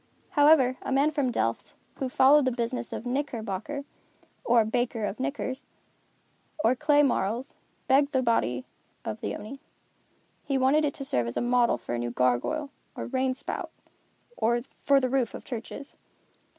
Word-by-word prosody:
However, 290 -5 +5
a - - -5
man 280 +3 +3
from 285 -5 0
Delft, 115 - -2 0.2
who 265 - -2
followed 275 +3 +5
the 255 - +2
business 235 0 -3
of - - -5
a - - -3
knickerbocker, 260 0 -3 0.6
or 235 -2 +4
baker 230 0 -1
of 205 - -4
knickers, 260 -1 -3 1.0
or 230 - +5
clay 295 +2 +4
marles, 240 -1 0 0.3
begged 280 +2 +4
the 260 -2 +1
body 125 - +1 0.4
of 215 - -4
the - - -3
Oni. 250 +6 -8 0.8
He 275 - 0
wanted 275 +4 +3
it 285 - -2
to 275 - -6
serve 120 - 0
as 115 - -4
a - - +2
model 240 -1 +3
for - - -6
a 120 - -1
new 120 0 -2
gargoyle, 125 - 0 0.2
or - - -5
rain 260 -1 0
spout, 275 - -5 0.7
for 240 +4 +1
the 255 - 0
roof 255 -3 0
of - - -9
churches. 255 +3 -7
255 Hz, 165 wpm, -27 LUFS, 230-280 Hz, 1.0 s, However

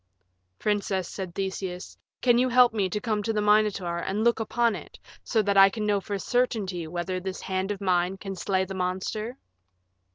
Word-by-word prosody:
"Princess," 200 -3 -1
said 185 -3 -6
Theseus, 190 -2 -4 0.3
"can 240 -1 +5
you 255 +1 +3
help 245 -1 +5
me 200 -4 0
to 210 - -2
come 215 -2 -1
to 225 - -1
the 215 - 0
Minotaur 210 -4 +2
and 200 +5 -2
look 235 0 +3
upon 230 0 +1
it - - -10 0.3
so 220 -3 +1
that 200 0 +1
I 195 0 +9
can 210 +1 -4
know 205 -1 +1
for 200 +1 -3
certainty 195 -6 -1
whether 175 +2 -3
this 185 +1 -5
hand 190 +1 -2
of 205 -2 -3
mine 180 0 +1
can 195 0 -6
slay 190 +1 0
the 195 - -7
monster?" 190 +6 -3
195 Hz, 190 wpm, -26 LUFS, 185-215 Hz, 0.3 s, I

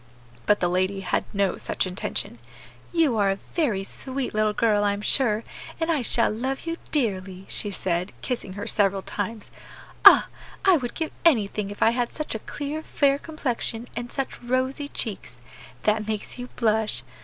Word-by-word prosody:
But 210 - +4
the 175 - +3
lady 185 +2 0
had 185 - 0
no 200 -3 +1
such - - -1
intention. 185 +1 -3 0.5
"You 320 -9 +3
are 200 -2 +3
a 195 - +2
very 215 - -1
sweet 260 +6 -4
little 215 0 +2
girl, 210 -1 +2
I 205 0 +2
am 200 - -5
sure, 220 -2 +2 0.4
and 330 0 +1
I 305 -5 +1
shall 230 0 +3
love 260 +5 -2
you 330 0 -2
dearly," 190 -8 -1
she 205 - -3
said, 185 -1 -2
kissing 240 -7 -3
her 205 +2 -5
several 200 -3 +1
times. 210 +1 -4 0.5
"Ah! - - +10 0.4
I 380 -2 +7
would 245 -4 -4
give 320 -2 -2
anything 210 -9 +3
if 205 - -2
I 225 - +6
had 240 0 -1
such 305 - -4
a 220 - -3
clear 290 +6 -5
fair 280 -3 +2
complexion 245 -7 -3
and 240 0 -4
such 270 -2 -4
rosy 260 +4 -1
cheeks. 220 -7 -4 0.4
That 215 0 +1
makes 215 +3 -3
you 245 - -5
blush. 220 -2 +1
225 Hz, 175 wpm, -25 LUFS, 200-265 Hz, 0.5 s, Ah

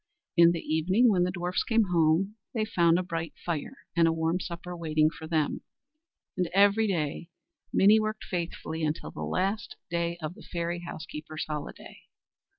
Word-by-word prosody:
In 170 -1 +7
the 170 - -3
evening 185 +10 +3
when 180 -3 +3
the - - 0
dwarfs 180 0 -1
came 225 -4 +2
home, 170 +4 +3 0.2
they 220 -1 +1
found 170 -5 +3
a 185 - 0
bright 165 -3 -4
fire 170 - -3 0.2
and 170 -1 +5
a - - +3
warm 165 +2 0
supper 175 0 -6
waiting 155 -2 +2
for 160 -1 -9
them; 155 -3 0 0.7
and 180 -3 0
every 205 +2 +5
day 165 -2 -2 0.4
Minnie 210 +3 +6
worked 215 0 -2
faithfully 165 -2 -4
until 155 +1 -2
the - - -8
last 200 +5 -1 0.2
day 170 0 -1
of 155 0 -4
the - - -15
fairy 170 0 -3
house 170 -2 -7
keeper's 155 0 -6
holiday. 150 -1 -7
170 Hz, 170 wpm, -28 LUFS, 160-190 Hz, 0.7 s, In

